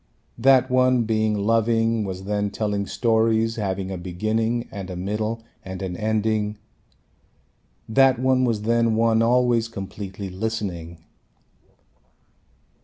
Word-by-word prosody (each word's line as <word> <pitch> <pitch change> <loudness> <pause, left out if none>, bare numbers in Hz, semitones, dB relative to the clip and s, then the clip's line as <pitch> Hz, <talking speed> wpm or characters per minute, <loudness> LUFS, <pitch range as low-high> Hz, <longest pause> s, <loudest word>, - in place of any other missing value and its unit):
That 130 +1 +4
one 130 -1 +3
being 110 -1 0
loving 115 +1 +1
was 95 -1 -5
then 105 +1 -1
telling 105 -1 -2
stories 115 -1 +1
having 95 -2 -2
a 95 - -4
beginning 110 +6 -1
and 95 -2 -7
a 90 - -5
middle 105 +5 -3 0.2
and 95 0 -7
an 90 -2 -4
ending. 110 0 -1 1.3
That 130 +3 +4
one 130 +1 +2
was 115 -4 0
then 115 0 +2
one 115 0 +3
always 120 -1 +3
completely 95 -2 -7
listening. 90 -5 -4
110 Hz, 115 wpm, -23 LUFS, 100-115 Hz, 1.3 s, That